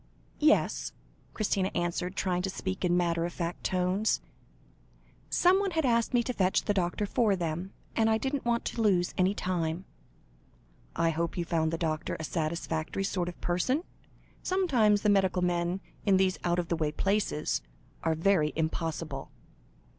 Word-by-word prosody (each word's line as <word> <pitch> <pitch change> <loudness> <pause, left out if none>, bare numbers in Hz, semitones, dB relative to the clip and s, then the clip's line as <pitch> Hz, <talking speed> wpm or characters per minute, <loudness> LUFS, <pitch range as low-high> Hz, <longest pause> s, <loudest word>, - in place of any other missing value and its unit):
"Yes," 305 0 +2 0.4
Christina, 195 -3 +1
answered, 175 +2 -1
trying 180 -3 0
to 190 - -2
speak 190 0 -4
in 175 -1 +3
matter 170 -1 +1
of 170 0 -3
fact 170 0 -4
tones; 185 +3 +1 1.1
"someone 385 +3 +4
had 320 -4 0
asked 235 -2 +2
me 245 -2 +3
to 250 - -2
fetch 190 -4 +2
the 205 - +1
doctor 185 +2 0
for 205 0 +2
them, 175 +2 -3 0.2
and 225 -1 +3
I 220 - +3
didn't 270 +3 -2
want 235 -1 0
to 230 - -2
lose 185 -5 +2
any 185 +2 +2
time." 175 -1 -2 1.1
"I 165 0 +2
hope 165 +2 -2
you 175 - -1
found 160 -1 +1
the 165 - -1
doctor 160 -2 -2
a - - -4
satisfactory 160 +2 -2
sort 180 -2 -1
of 175 - -10
person? 255 - 0 0.6
Sometimes 250 - +2
the 210 - +3
medical 190 -2 +3
men 175 +1 0 0.2
in 195 -3 +4
these 190 -1 +2
out 175 0 +1
of 175 -1 -2
the 170 - +1
way 155 -2 0
places, 195 - 0 0.4
are 160 -1 +1
very 160 -2 +2
impossible." 160 -3 -3
180 Hz, 160 wpm, -29 LUFS, 170-210 Hz, 1.1 s, someone